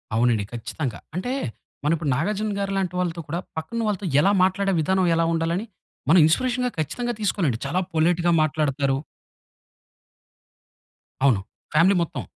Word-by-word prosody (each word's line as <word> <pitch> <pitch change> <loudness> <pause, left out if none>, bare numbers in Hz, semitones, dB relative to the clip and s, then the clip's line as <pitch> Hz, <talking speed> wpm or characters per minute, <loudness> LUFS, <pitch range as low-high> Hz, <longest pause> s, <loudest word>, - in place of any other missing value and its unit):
అవునండి. 115 -3 +2
ఖచ్చితంగా. 120 0 -4 0.2
అంటే 245 +8 -2 0.5
మనం 150 +3 +2
ఇప్పుడు 155 -3 -3
నాగార్జునగారి 200 +4 -1
లాంటి 185 -2 -1
వాళ్ళతో 170 -2 -1
కూడా, 170 +4 -2 0.2
పక్కనున్న 230 +7 -3
వాళ్ళతో 205 -2 -2 0.2
ఎలా 195 - +4
మాట్లాడే 195 +1 +1
విధానం 190 +3 +2
ఎలా 165 0 +2
ఉండాలని 165 +6 -1 0.4
మనం 175 +2 +7
ఇన్స్పిరేషన్‌గా 250 +7 +1
ఖచ్చితంగా 240 - -2
తీసుకోలండి. 180 - 0
చాలా 180 - 0
పొలైట్‌గా 170 +2 +2
మాట్లాడతారు. 145 -3 +1 2.3
అవును. 110 -8 +4 0.3
ఫ్యామిలీ 180 +4 +5
మొత్తం. 150 - -5
170 Hz, 125 wpm, -24 LUFS, 155-200 Hz, 2.3 s, మనం